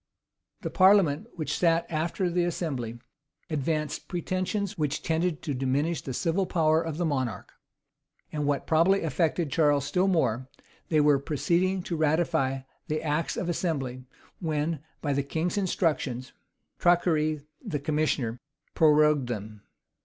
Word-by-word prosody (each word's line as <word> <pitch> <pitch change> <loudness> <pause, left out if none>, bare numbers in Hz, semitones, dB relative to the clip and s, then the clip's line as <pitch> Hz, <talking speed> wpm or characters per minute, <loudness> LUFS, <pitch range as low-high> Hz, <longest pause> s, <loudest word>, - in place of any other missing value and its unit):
The - - -4
parliament, 190 -2 +4
which 155 -4 -2
sat 165 -1 +3
after 170 +4 -1
the 175 0 +1
assembly, 140 -9 -3 0.5
advanced 150 +1 -2
pretensions 185 +3 -2
which 155 -4 -2
tended 165 0 0
to 150 - -2
diminish 135 +4 0
the 135 - -6
civil 185 +5 0
power 160 -2 +3
of 165 -2 -4
the 175 - 0
monarch; 130 -7 -2 0.8
and, 150 -2 -2
what 145 -2 0
probably 170 +5 +3
affected 160 -1 0
Charles 145 -3 +3
still 180 +6 +1
more, 130 - +1 0.4
they 155 -2 +4
were 145 -2 +4
proceeding 175 +6 0
to 175 - -3
ratify 155 -4 +1 0.3
the 155 +1 -2
acts 155 +1 -1
of 180 - -2
assembly, 135 -8 -2 0.4
when, 155 -2 -1 0.2
by 145 -2 +1
the 140 - +1
king's 160 +5 -2
instructions,[*] 155 -10 -1 0.5
Traquaire, 155 -4 +2 0.2
the 150 - -2
commissioner, 145 -6 0 0.3
prorogued 150 -3 +4
them. 105 -3 -6
155 Hz, 135 wpm, -27 LUFS, 145-170 Hz, 0.8 s, parliament